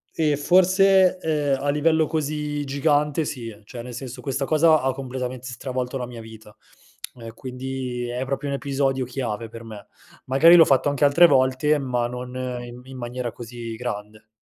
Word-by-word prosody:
Ehm, 150 Hz, -3 st, +2 dB
forse, 185 Hz, +3 st, +4 dB
ehm, 150 Hz, -4 st, 0 dB
a 145 Hz, -, 0 dB
livello 160 Hz, +1 st, +2 dB
così 150 Hz, -1 st, -2 dB
gigante 145 Hz, +2 st, +1 dB
sì. 115 Hz, -7 st, -6 dB
Cioè 120 Hz, +1 st, -8 dB
nel 125 Hz, 0 st, -9 dB
senso, 125 Hz, 0 st, -7 dB
questa 135 Hz, +1 st, -2 dB
cosa 155 Hz, 0 st, +4 dB
ha 135 Hz, 0 st, +1 dB
completamente 130 Hz, -1 st, -5 dB
stravolto 125 Hz, +1 st, -4 dB
la 125 Hz, -1 st, -4 dB
mia 120 Hz, -2 st, -9 dB
vita, 110 Hz, -1 st, -13 dB, 0.6 s
ehm, 115 Hz, -2 st, -10 dB
quindi 125 Hz, -1 st, -5 dB
è 125 Hz, +2 st, -3 dB
proprio 140 Hz, +2 st, -3 dB
un 140 Hz, -, -1 dB
episodio 135 Hz, -2 st, -1 dB
chiave 120 Hz, -3 st, -4 dB
per 115 Hz, +1 st, -10 dB
me. 105 Hz, -3 st, -10 dB, 0.4 s
Magari 160 Hz, +7 st, +6 dB
l'ho 165 Hz, -2 st, +8 dB
fatto 135 Hz, +1 st, +3 dB
anche 145 Hz, 0 st, +2 dB
altre 170 Hz, +5 st, +6 dB
volte 135 Hz, +2 st, +3 dB
ma 125 Hz, -3 st, -1 dB
non 125 Hz, +1 st, -7 dB, 0.3 s
in 120 Hz, 0 st, -10 dB
in 130 Hz, -1 st, -10 dB
maniera 120 Hz, 0 st, -4 dB
così 120 Hz, -1 st, -8 dB
grande. 105 Hz, -2 st, -6 dB
130 Hz, 170 wpm, -23 LUFS, 120-145 Hz, 0.6 s, l'ho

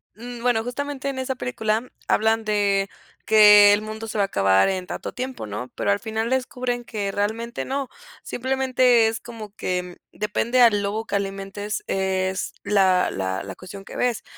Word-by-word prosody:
mm, 240 Hz, +1 st, -8 dB
bueno, 240 Hz, -2 st, +2 dB
justamente, 280 Hz, +3 st, -4 dB
en 265 Hz, -, -4 dB
esa 260 Hz, 0 st, -2 dB
película, 225 Hz, -1 st, -2 dB, 0.2 s
hablan 220 Hz, +1 st, +2 dB
de 200 Hz, -2 st, +1 dB, 0.4 s
que, 210 Hz, -1 st, +8 dB
el 205 Hz, -, +1 dB
mundo 220 Hz, +1 st, -6 dB
se 220 Hz, -, -5 dB
va 200 Hz, -, +3 dB
a -, -, -6 dB
acabar 95 Hz, -, +3 dB
en 185 Hz, -1 st, -2 dB
tanto -, -, -6 dB
tiempo, 255 Hz, -, -5 dB
¿no? 105 Hz, +5 st, -5 dB
Pero, -, -, 0 dB
al 200 Hz, -, +1 dB
final 220 Hz, 0 st, -2 dB
descubren 250 Hz, -1 st, -2 dB
que 205 Hz, -4 st, -3 dB
realmente 225 Hz, +3 st, -2 dB
no. 275 Hz, -1 st, -3 dB, 0.3 s
Simplemente, 255 Hz, -2 st, +2 dB
es 225 Hz, 0 st, -3 dB
como 220 Hz, -3 st, -10 dB
que, 180 Hz, 0 st, -2 dB
mm, 180 Hz, -1 st, -10 dB, 0.2 s
depende 225 Hz, +4 st, 0 dB
al 210 Hz, -4 st, +5 dB
lobo 215 Hz, +3 st, -2 dB
que 200 Hz, -, -3 dB
alimentes, 200 Hz, +1 st, -4 dB
es 190 Hz, -1 st, -1 dB
la 190 Hz, -3 st, +3 dB
la 95 Hz, 0 st, -2 dB
la 95 Hz, -1 st, -7 dB
cuestión 195 Hz, +2 st, -10 dB
que -, -, -10 dB
ves. 245 Hz, -2 st, 0 dB
215 Hz, 180 wpm, -23 LUFS, 195-245 Hz, 0.4 s, que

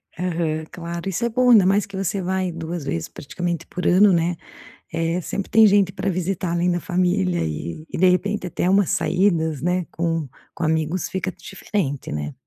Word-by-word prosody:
Aham, 165 Hz, -3 st, -2 dB
claro. 170 Hz, 0 st, -6 dB
Isso 195 Hz, +6 st, -1 dB
é -, -, +1 dB
bom, 250 Hz, +2 st, +3 dB
ainda 215 Hz, -6 st, +7 dB
mais 200 Hz, +2 st, +3 dB
que 200 Hz, -1 st, -11 dB
você 195 Hz, +1 st, -1 dB
vai 185 Hz, 0 st, -1 dB
2 165 Hz, 0 st, -5 dB
vezes, 85 Hz, -, -2 dB
praticamente, 170 Hz, +3 st, -4 dB
por 180 Hz, -, -5 dB
ano, 195 Hz, +3 st, +6 dB
né. 170 Hz, 0 st, +1 dB, 0.6 s
Eh, 165 Hz, +2 st, 0 dB
sempre 195 Hz, +3 st, -4 dB
tem 220 Hz, +1 st, +6 dB
gente 200 Hz, -2 st, +4 dB
pra 195 Hz, +1 st, -2 dB
visitar, 185 Hz, 0 st, -2 dB
além 175 Hz, +1 st, +1 dB
da 175 Hz, -, 0 dB
família 180 Hz, 0 st, 0 dB
e 80 Hz, -, -5 dB
e -, -, -5 dB
de 185 Hz, +2 st, +5 dB
repente 195 Hz, +2 st, 0 dB
até 180 Hz, +1 st, -1 dB
umas 195 Hz, -1 st, +3 dB
saídas, 160 Hz, -3 st, +1 dB
né, 180 Hz, +1 st, 0 dB
com 165 Hz, -2 st, -1 dB, 0.3 s
com 175 Hz, -, -5 dB
amigos. 160 Hz, +2 st, 0 dB
Fica 190 Hz, 0 st, -2 dB
diferente, 170 Hz, -6 st, -4 dB
né? 75 Hz, -1 st, -4 dB
180 Hz, 190 wpm, -22 LUFS, 165-190 Hz, 0.6 s, ainda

